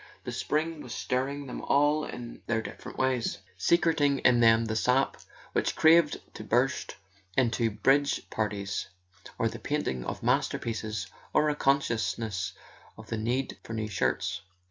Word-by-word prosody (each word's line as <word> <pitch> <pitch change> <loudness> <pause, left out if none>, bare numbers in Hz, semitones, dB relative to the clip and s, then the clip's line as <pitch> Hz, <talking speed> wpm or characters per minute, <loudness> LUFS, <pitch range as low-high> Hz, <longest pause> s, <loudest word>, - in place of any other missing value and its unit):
The - - -4
spring 155 +1 -1
was 120 -3 -7
stirring 140 +3 -2
them 125 - -6
all 145 +2 +3
in 120 -1 -8
their 115 -1 +1
different - - -9
ways, 130 -4 0 0.2
secreting 145 - +3
in 125 -2 +4
them 115 0 +5
the 110 0 -2
sap 125 +4 +2 0.4
which - - 0
craved 160 -1 +5
to - - -8
burst 125 +5 +1 0.4
into 120 -2 +2
bridge 140 +6 +2
parties, 100 -3 -2 0.5
or 115 - +2
the - - -5
painting 145 - -2
of - - -5
masterpieces, 110 -3 0 0.3
or 150 0 +4
a - - -3
consciousness 110 -9 0 0.4
of 110 0 -12
the 115 - -2
need 125 +5 -1
for 115 - -8
new 110 -1 -2
shirts. 100 -4 -1
120 Hz, 145 wpm, -29 LUFS, 110-140 Hz, 0.5 s, them